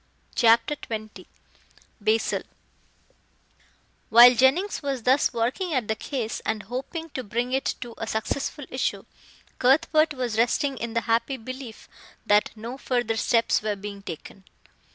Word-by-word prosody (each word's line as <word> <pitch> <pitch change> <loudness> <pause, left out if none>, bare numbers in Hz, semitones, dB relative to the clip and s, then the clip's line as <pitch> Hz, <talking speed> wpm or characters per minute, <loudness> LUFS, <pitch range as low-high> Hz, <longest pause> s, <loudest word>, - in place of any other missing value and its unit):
CHAPTER 230 +4 +4
XX 215 -5 -7 0.7
BASIL 220 +2 +1 1.7
While 240 +2 +9
Jennings 270 - +2
was 275 -5 -3
thus 260 +4 +3
working 260 +9 -1
at 245 -5 0
the 220 - 0
case, 230 -2 -4
and 215 -1 -2
hoping 275 - -6
to 260 - -4
bring 240 +4 -2
it 265 - 0
to 240 -2 -7
a 225 - -4
successful 265 +6 -3
issue, 260 - -2 0.5
Cuthbert 310 +3 +3
was 240 -4 -2
resting 275 +4 +1
in 230 0 -5
the 230 - +2
happy 230 +4 0
belief 255 -1 -9 0.4
that 210 0 +3
no 235 +5 -7
further 245 -4 -1
steps 230 +1 +2
were 210 -1 -1
being 200 0 -8
taken. 190 +1 -9
240 Hz, 135 wpm, -25 LUFS, 220-270 Hz, 1.7 s, While